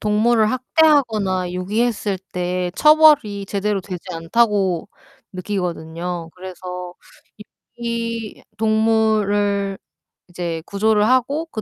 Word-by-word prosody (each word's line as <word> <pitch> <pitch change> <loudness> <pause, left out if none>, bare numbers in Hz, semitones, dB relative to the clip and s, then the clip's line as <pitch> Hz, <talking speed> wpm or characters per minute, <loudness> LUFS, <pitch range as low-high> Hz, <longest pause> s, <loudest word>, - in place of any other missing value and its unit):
동물을 215 +1 +2
학대하거나 235 - +2
유기했을 205 +1 -1
때 180 0 -2
처벌이 300 -11 +5
제대로 200 0 -1
되지 180 -2 -7
않다고 190 +1 +1 0.5
느끼거든요. 175 -3 -4
그래서 180 -1 -8 0.8
유기 230 -2 -4 0.2
동물을 215 -3 +1 0.5
이제 170 -2 -4
구조를 210 +1 +2
하고 275 +6 +1
그 215 - -4
205 Hz, 235 characters per minute, -20 LUFS, 180-225 Hz, 0.8 s, 처벌이